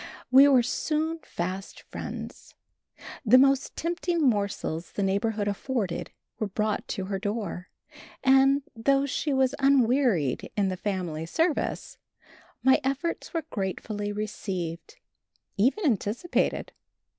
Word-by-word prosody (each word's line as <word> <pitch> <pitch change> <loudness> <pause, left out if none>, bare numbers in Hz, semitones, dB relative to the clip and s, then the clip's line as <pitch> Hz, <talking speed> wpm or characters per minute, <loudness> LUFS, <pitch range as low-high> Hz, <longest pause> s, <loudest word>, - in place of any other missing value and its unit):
We 270 +2 +9
were 260 -4 +5
soon 315 +6 -1
fast 185 +3 -5
friends. - - -8 0.7
The 245 +1 +7
most 270 0 +3
tempting 345 +1 -1
morsels 200 - 0
the 200 - -1
neighborhood 205 +2 0
afforded 205 -2 -2 0.3
were 215 - 0
brought 210 +1 -2
to 190 - -3
her 195 0 -3
door, 205 -3 -4 0.5
and, 270 +1 +5
though 275 +4 +2
she 285 +2 -2
was 265 -1 +2
unwearied 250 - +2
in 200 -2 +2
the 185 - -2
family 180 -5 -3
service, 320 - -1 0.6
my 265 +2 +5
efforts 275 +6 -2
were 330 -3 -3
gratefully 205 +1 -3
received, 190 -5 -5 0.6
even 265 - +2
anticipated. 240 - 0
225 Hz, 115 wpm, -27 LUFS, 195-275 Hz, 0.7 s, We